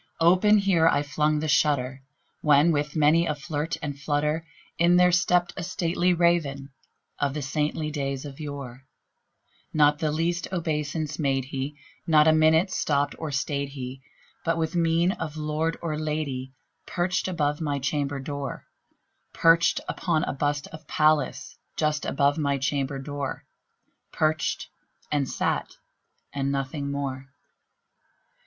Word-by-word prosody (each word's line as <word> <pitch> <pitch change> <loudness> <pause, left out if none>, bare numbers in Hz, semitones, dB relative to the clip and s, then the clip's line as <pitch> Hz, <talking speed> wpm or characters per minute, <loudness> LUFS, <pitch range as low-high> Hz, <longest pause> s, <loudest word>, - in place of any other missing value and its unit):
Open 185 +6 +5
here 190 -5 +3
I 145 -3 +3
flung 150 +1 +1
the 155 - -2
shutter, 135 -3 +1 0.4
when, 150 +2 +5
with 150 0 -1
many 160 +2 +4
a 150 - 0
flirt 150 +1 -3
and 145 -2 -4
flutter, 150 +2 -1 0.3
In 170 +1 +5
there 180 0 +5
stepped 175 0 +2
a - - -5
stately 175 0 0
Raven 165 -6 +1 0.5
of 140 -1 0
the 150 - -3
saintly 150 +2 -1
days 140 -2 -3
of 140 0 -9
yore; 135 -4 -7 0.9
Not 150 -1 +4
the 155 -2 0
least 170 +3 -1
obeisance 155 -3 -2
made 135 -3 +1
he: 135 +2 -5 0.3
not 155 -1 +5
an 155 0 +5
instant 160 +4 +4
stopped 145 -3 0
or 160 - -3
stayed 140 0 -1
he; 130 -1 -7 0.4
But, 165 0 0
with 160 +1 -1
mien 170 +1 +3
of 160 -5 -5
lord 155 +2 -1
or 155 -2 -2
lady, 140 -4 -3 0.3
perched 180 +1 -1
above 150 -4 -1
my 145 -2 -1
chamber 140 0 -1
door 140 0 -5 0.7
Perched 165 +1 +4
upon 160 -4 0
a - - -2
bust 145 +1 -1
of 155 0 -12
Pallas 155 -3 +1 0.2
just 150 -1 0
above 140 +2 +1
my 140 -2 +1
chamber 135 0 -1
door 140 0 -5 0.7
Perched, 155 0 0 0.4
and 145 -3 0
sat, - - -1 0.6
and 140 -1 -1
nothing 140 +1 -3
more. 135 -2 -4
150 Hz, 140 wpm, -26 LUFS, 140-165 Hz, 0.9 s, Open